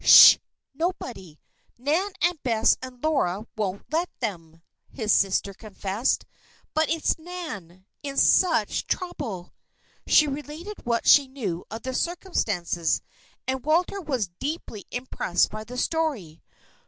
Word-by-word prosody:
"Sh! -, -, +11 dB, 0.4 s
Nobody. 255 Hz, -, -4 dB, 0.4 s
Nan 310 Hz, +11 st, +1 dB
and 350 Hz, -2 st, +2 dB
Bess 225 Hz, -4 st, +3 dB
and 255 Hz, -1 st, -9 dB
Laura 220 Hz, -, +1 dB
wouldn't 200 Hz, -3 st, -3 dB
let 340 Hz, +3 st, +1 dB
them," 165 Hz, -8 st, -5 dB, 0.3 s
his 215 Hz, -5 st, 0 dB
sister 195 Hz, 0 st, +2 dB
confessed. 210 Hz, +3 st, -2 dB, 0.5 s
"But 315 Hz, 0 st, +2 dB
it's 325 Hz, 0 st, +1 dB
Nan 265 Hz, -, -8 dB, 0.2 s
in 275 Hz, -1 st, -5 dB
such 330 Hz, -, +3 dB
trouble!" 265 Hz, -, -4 dB, 0.5 s
She 305 Hz, -, +6 dB
related 300 Hz, +6 st, -6 dB
what 235 Hz, -1 st, 0 dB
she 285 Hz, -2 st, +7 dB
knew 210 Hz, -11 st, -4 dB
of 225 Hz, +1 st, -7 dB
the 260 Hz, -, -3 dB
circumstances, 210 Hz, -, -1 dB, 0.4 s
and 260 Hz, -1 st, -1 dB
Walter 345 Hz, +6 st, +1 dB
was 255 Hz, -, -2 dB
deeply 275 Hz, -8 st, -5 dB
impressed 245 Hz, -7 st, 0 dB
by 215 Hz, 0 st, -6 dB
the 250 Hz, +3 st, -8 dB
story. 255 Hz, -, -1 dB
255 Hz, 125 wpm, -25 LUFS, 200-315 Hz, 0.5 s, Sh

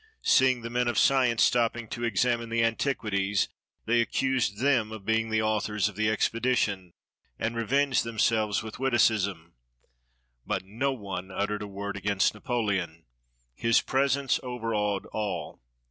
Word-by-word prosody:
Seeing 130 Hz, -2 st, +4 dB
the 115 Hz, -, -5 dB
men 125 Hz, 0 st, 0 dB
of 120 Hz, -3 st, -1 dB
science 125 Hz, -3 st, +4 dB
stopping 120 Hz, -1 st, +1 dB
to 120 Hz, -, -5 dB
examine 115 Hz, +1 st, 0 dB
the 115 Hz, 0 st, +1 dB
antiquities, 105 Hz, -5 st, 0 dB, 0.4 s
they 115 Hz, +1 st, +3 dB
accused 130 Hz, -4 st, 0 dB
them 120 Hz, -4 st, +2 dB
of 110 Hz, -3 st, -8 dB
being 110 Hz, 0 st, +1 dB
the 110 Hz, 0 st, +1 dB
authors 105 Hz, -1 st, 0 dB
of 105 Hz, -, -7 dB
the 110 Hz, +1 st, +1 dB
expedition, 110 Hz, -5 st, 0 dB, 0.4 s
and 115 Hz, +1 st, -2 dB
revenged 130 Hz, +4 st, +1 dB
themselves 110 Hz, -2 st, +1 dB
with 110 Hz, +1 st, -8 dB
witticisms. 105 Hz, -9 st, +1 dB, 0.9 s
But -, -, -3 dB
no 120 Hz, +8 st, -1 dB
one 100 Hz, -7 st, -6 dB
uttered 105 Hz, +2 st, -2 dB
a 105 Hz, -, -5 dB
word 100 Hz, 0 st, -5 dB
against 100 Hz, 0 st, +1 dB
Napoleon. 100 Hz, -, -2 dB, 0.5 s
His 115 Hz, -, +2 dB
presence 135 Hz, 0 st, +1 dB
overawed 115 Hz, -5 st, -2 dB
all. 105 Hz, -2 st, -4 dB
110 Hz, 140 wpm, -27 LUFS, 100-120 Hz, 0.9 s, Seeing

